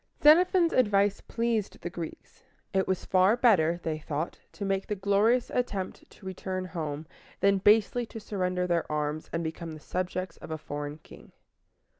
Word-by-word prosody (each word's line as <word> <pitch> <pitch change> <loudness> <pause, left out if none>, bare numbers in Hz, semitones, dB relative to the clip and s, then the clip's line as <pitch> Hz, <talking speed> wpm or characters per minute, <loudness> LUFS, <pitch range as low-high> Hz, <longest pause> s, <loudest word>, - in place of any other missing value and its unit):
Xenophon's 340 +3 +6
advice 205 -4 +3
pleased 230 -3 -1
the 175 - -4
Greeks. 170 -2 -8 0.3
It 190 0 +2
was 190 -1 -1
far 190 +5 +4
better, 175 -9 +4
they 155 -1 -2
thought, 155 +1 -4
to 200 - -5
make 195 0 -1
the 210 - -1
glorious 205 +5 +2
attempt 205 -7 -3
to - - -17
return 185 0 -4
home, 160 -4 -4 0.3
than 200 0 +3
basely 220 +4 +4
to 225 - -8
surrender 180 -3 -1
their 170 -3 0
arms, 150 +1 -2
and 165 0 -2
become 160 0 -5
the 155 - -9
subjects 185 +2 -3
of - - -11
a 160 - -3
foreign 145 0 -5
king. - - -15
185 Hz, 165 wpm, -28 LUFS, 165-210 Hz, 0.3 s, Xenophon's